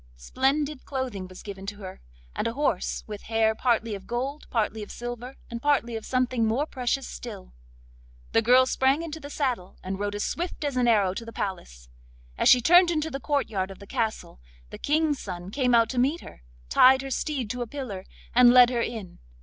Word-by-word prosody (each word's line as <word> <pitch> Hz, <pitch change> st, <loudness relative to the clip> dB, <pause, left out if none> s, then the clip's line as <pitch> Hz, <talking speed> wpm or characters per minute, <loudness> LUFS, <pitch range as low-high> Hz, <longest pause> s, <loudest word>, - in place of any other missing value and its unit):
Splendid 275 Hz, -, -1 dB
clothing 255 Hz, -9 st, -4 dB
was 185 Hz, 0 st, -12 dB
given 195 Hz, -1 st, -8 dB
to 205 Hz, -, -4 dB
her, 190 Hz, -2 st, -9 dB, 0.3 s
and -, -, -1 dB
a 230 Hz, -, -2 dB
horse, 275 Hz, -8 st, -1 dB
with 210 Hz, -2 st, -7 dB
hair 225 Hz, -1 st, +3 dB
partly 230 Hz, -1 st, 0 dB
of 195 Hz, -1 st, -8 dB
gold, 265 Hz, +5 st, -3 dB
partly 220 Hz, -1 st, -1 dB
of 205 Hz, -, -8 dB
silver, 245 Hz, +2 st, -6 dB
and 235 Hz, 0 st, -6 dB
partly 275 Hz, -5 st, +1 dB
of 220 Hz, -, -6 dB
something 255 Hz, -2 st, +1 dB
more 230 Hz, +7 st, +1 dB
precious 265 Hz, -1 st, -2 dB
still. -, -, -9 dB, 0.8 s
The 225 Hz, -, +4 dB
girl 250 Hz, +3 st, +6 dB
sprang 265 Hz, +4 st, +2 dB
into 320 Hz, -1 st, -6 dB
the 285 Hz, -1 st, -9 dB
saddle, 250 Hz, -11 st, -2 dB
and 190 Hz, +1 st, -4 dB
rode 205 Hz, 0 st, -2 dB
as 205 Hz, -, -2 dB
swift 345 Hz, -2 st, -3 dB
as 285 Hz, -2 st, -2 dB
an 250 Hz, -1 st, +2 dB
arrow 205 Hz, -5 st, +3 dB
to 230 Hz, -, -6 dB
the 230 Hz, -, -9 dB
palace. 175 Hz, -, -5 dB, 0.5 s
As -, -, +3 dB
she 250 Hz, -, +7 dB
turned 350 Hz, +7 st, +6 dB
into 320 Hz, -1 st, -1 dB
the 275 Hz, -, -4 dB
courtyard 225 Hz, -10 st, -1 dB
of 195 Hz, -, -10 dB
the 200 Hz, -, -12 dB
castle 220 Hz, -, -3 dB, 0.3 s
the -, -, -8 dB
King's 300 Hz, -1 st, +1 dB
son 180 Hz, -1 st, -7 dB
came 250 Hz, -1 st, +2 dB
out 230 Hz, -1 st, +5 dB
to 250 Hz, -, -1 dB
meet 285 Hz, +7 st, +1 dB
her, -, -, -13 dB, 0.3 s
tied 260 Hz, -, +6 dB
her 270 Hz, -, -6 dB
steed 260 Hz, -5 st, -2 dB
to 250 Hz, -, -4 dB
a 240 Hz, -, -3 dB
pillar, 220 Hz, -8 st, -6 dB, 0.3 s
and 245 Hz, 0 st, +7 dB
led 250 Hz, 0 st, +7 dB
her 240 Hz, -2 st, 0 dB
in. 220 Hz, -7 st, -5 dB
240 Hz, 205 wpm, -26 LUFS, 205-270 Hz, 0.8 s, she